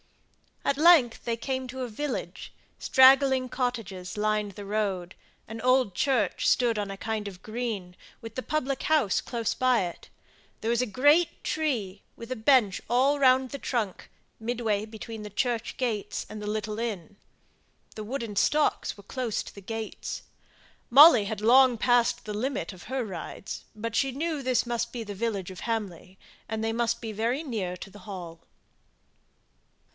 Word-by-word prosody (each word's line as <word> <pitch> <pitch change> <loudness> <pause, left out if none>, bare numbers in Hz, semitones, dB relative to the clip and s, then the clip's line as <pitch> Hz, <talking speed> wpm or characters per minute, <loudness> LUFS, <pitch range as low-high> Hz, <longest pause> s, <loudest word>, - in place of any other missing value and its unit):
At 280 - +1
length 305 -7 +5
they 230 -1 -1
came 260 +2 -3
to 260 +1 -6
a 250 - -2
village; 275 +5 -5 0.3
straggling 265 -1 +5
cottages 215 -8 -3
lined 210 -1 0
the 205 +2 -9
road, 195 -4 -2 0.3
an 225 +1 -7
old 255 -4 +3
church 240 -4 +1
stood 235 -3 +3
on 205 -1 -3
a 195 - -6
kind 215 0 -3
of 190 -1 -10
green, 215 -6 -4 0.2
with 225 -1 -9
the 255 - -2
public 275 -2 -2
house 305 -11 +2
close 230 -3 -2
by 255 -3 +2
it; 175 -1 -7 0.5
there 225 - 0
was 235 0 +2
a - - +1
great 290 - +3
tree, 230 -12 -2
with 230 +2 -10
a - - 0
bench 220 -4 +3
all 270 +4 +3
round 260 -1 +4
the 280 - -6
trunk, 225 -9 -3 0.3
midway 225 -3 -1
between 220 0 -8
the 210 - -7
church 235 +2 -2
gates 230 -6 -2
and 215 - -7
the 210 - -5
little 215 0 -3
inn. 205 -5 -4 0.8
The 215 - -5
wooden 230 -2 -4
stocks 300 +9 +1
were 200 - -14
close 235 0 -3
to - - -11
the 200 - -11
gates. 225 +2 -5 0.7
Molly 270 -4 +9
had 210 +1 -4
long 250 +2 +6
passed 245 +1 +2
the 210 - -4
limit 230 -4 -2
of 185 -2 -13
her 260 +2 -2
rides, 190 0 -7
but 225 +1 -4
she 270 +3 +2
knew 305 +2 -2
this 255 -2 +1
must 240 -1 -2
be 240 -2 -4
the 205 -2 -6
village 200 -4 -2
of 185 - -10
Hamley, 195 -5 -4 0.3
and 220 0 -3
that - - 0
they - - -1
must 235 0 0
be 225 -2 -4
very 230 +8 -1
near 210 - -3
to 190 - -9
the 205 - -13
hall. 175 -4 -7
230 Hz, 170 wpm, -27 LUFS, 205-255 Hz, 0.8 s, Molly